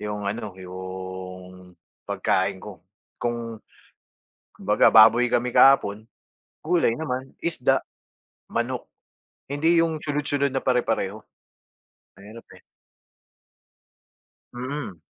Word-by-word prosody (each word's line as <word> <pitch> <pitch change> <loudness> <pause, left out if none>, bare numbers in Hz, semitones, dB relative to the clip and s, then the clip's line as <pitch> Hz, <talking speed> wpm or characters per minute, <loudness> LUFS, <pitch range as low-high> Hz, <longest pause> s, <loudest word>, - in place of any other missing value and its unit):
yung 105 -1 -4
ano, 105 -1 -4
yung 95 0 -9 0.3
pagkain 95 +1 0
ko 100 -6 -10 0.4
kung, 115 -2 -3 0.9
kumbaga - - +3
baboy 115 +3 +7
kami 125 0 0
kahapon, 110 -6 +5 0.6
gulay 165 -5 +2
naman, 130 -3 -4
isda, 135 -5 +1 0.7
manok, - - -3 0.6
hindi 160 +4 +2
yung 160 -2 -2
sunod 145 -1 -2
sunod 140 -1 +1
na 135 - -1
pare-pareho. 115 -5 0 1.0
Mahirap 105 +4 -13
eh. - - -23 1.9
Mm. 125 - -5
115 Hz, 90 wpm, -24 LUFS, 95-135 Hz, 1.9 s, baboy